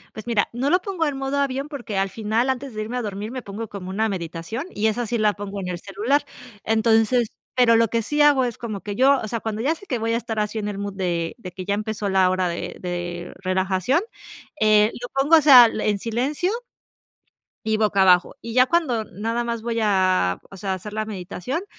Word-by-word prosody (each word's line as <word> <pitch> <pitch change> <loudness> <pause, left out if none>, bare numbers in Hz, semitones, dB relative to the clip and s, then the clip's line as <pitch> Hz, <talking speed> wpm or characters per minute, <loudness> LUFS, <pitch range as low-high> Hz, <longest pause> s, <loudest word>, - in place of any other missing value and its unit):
Pues 215 +1 -8
mira, 220 -4 +2
no 255 +4 0
lo 360 - +4
pongo 365 -4 -2
en 285 -2 -3
modo 270 +1 -2
avión, 275 0 -1
porque 240 -8 -5
al 195 0 +1
final 225 +4 0
antes 260 -2 -6
de 215 - -2
irme 235 +4 -4
a - - -1
dormir 210 +1 -5
me 255 - -5
pongo 220 +1 -6
como 195 -3 -8
una 220 +4 0
meditación, 180 - -5
y 215 - -3
esa 220 +2 0
sí 235 - -1
la 215 -1 +2
pongo 200 0 -6
en 185 -2 -4
el 175 -1 -4
celular. 220 +10 0 0.4
Entonces, 225 +1 +2 0.2
pero 245 -2 +5
lo 230 0 +4
que 230 +2 -1
sí 295 +6 0
hago 285 -3 +5
es 240 -2 -5
como 215 -4 -5
que 205 -1 -5
yo 270 +4 +4
o - - -3
sea, 230 +2 -3
cuando 220 0 -4
ya 295 +5 +2
sé 400 - -15
que 250 - -1
voy 225 0 -1
a - - +2
estar 225 -2 -5
así 210 +1 -1
en 210 - -3
el 205 -1 -4
mood 200 0 -4
de, 175 -1 -2
de 185 -5 -8
que 185 +1 -8
ya 200 - 0
empezó 210 0 -2
la 190 -1 +4
hora 185 0 +1
de, 170 0 -5
de 175 -1 -5
relajación, 190 - +1 0.6
eh, 215 0 +5
lo 245 - -6
pongo, 285 +5 +4
o - - +4
sea, 265 -5 +9
en 215 -2 0
silencio, 255 - -1 1.1
y 220 0 +1
boca 210 -2 +2
abajo. 180 -1 +4
Y 230 - -6
ya 255 +1 +6
cuando 255 -10 +1
nada 225 +5 -3
más 235 -1 -3
voy 230 0 -2
a 185 - +2
o 195 - -10
sea, 195 +1 -3
a - - +1
hacer 205 +3 -8
la 215 0 -2
meditación, 210 - -5
220 Hz, 235 wpm, -23 LUFS, 195-245 Hz, 1.1 s, sea